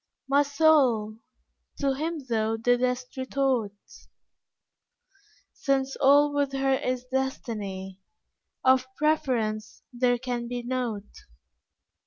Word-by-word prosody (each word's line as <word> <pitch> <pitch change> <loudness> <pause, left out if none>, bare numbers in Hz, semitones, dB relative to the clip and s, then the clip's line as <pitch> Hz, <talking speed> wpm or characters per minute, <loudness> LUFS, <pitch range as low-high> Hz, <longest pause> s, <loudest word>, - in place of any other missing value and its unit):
My 280 +1 +4
soul! 280 -8 +3 0.6
to 275 -1 +1
Him 310 +1 -4
thou 225 -1 0
didst 250 +2 0
retort 260 -5 0 1.8
"Since 270 -1 0
all 290 +1 +5
with 285 -1 0
her 270 0 +1
is 255 -1 -2
destiny, 210 -8 -4 0.6
Of 260 0 +4
preference 240 -8 -1
there 245 0 +2
can 240 -1 -4
be 245 0 -4
nought. 240 -5 -3
255 Hz, 95 wpm, -27 LUFS, 235-275 Hz, 1.8 s, all